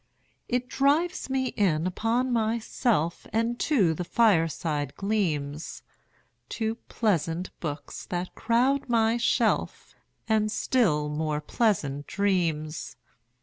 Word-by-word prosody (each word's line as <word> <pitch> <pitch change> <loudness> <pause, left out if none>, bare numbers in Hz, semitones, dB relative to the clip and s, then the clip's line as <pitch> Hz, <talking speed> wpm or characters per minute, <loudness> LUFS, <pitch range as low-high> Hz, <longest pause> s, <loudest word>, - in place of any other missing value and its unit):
It 250 0 0
drives 295 +6 +1
me 260 -1 0
in 170 -6 +1
upon 230 +7 0
myself 225 - 0
5 - - -15
And 230 +2 0
to 205 - +3
the 180 - -4
fireside 165 - +1
gleams, 160 -8 -2 0.7
To 220 -1 0 0.2
pleasant 180 -5 0
books 150 -3 -6
that 180 0 -3
crowd 250 +4 +1
my 225 0 +3
shelf, 240 - 0 0.3
And 215 -1 +2
still 195 -11 +1
more 150 0 -1
pleasant 150 - 0
dreams. 170 -6 -1
205 Hz, 105 wpm, -27 LUFS, 160-235 Hz, 0.7 s, to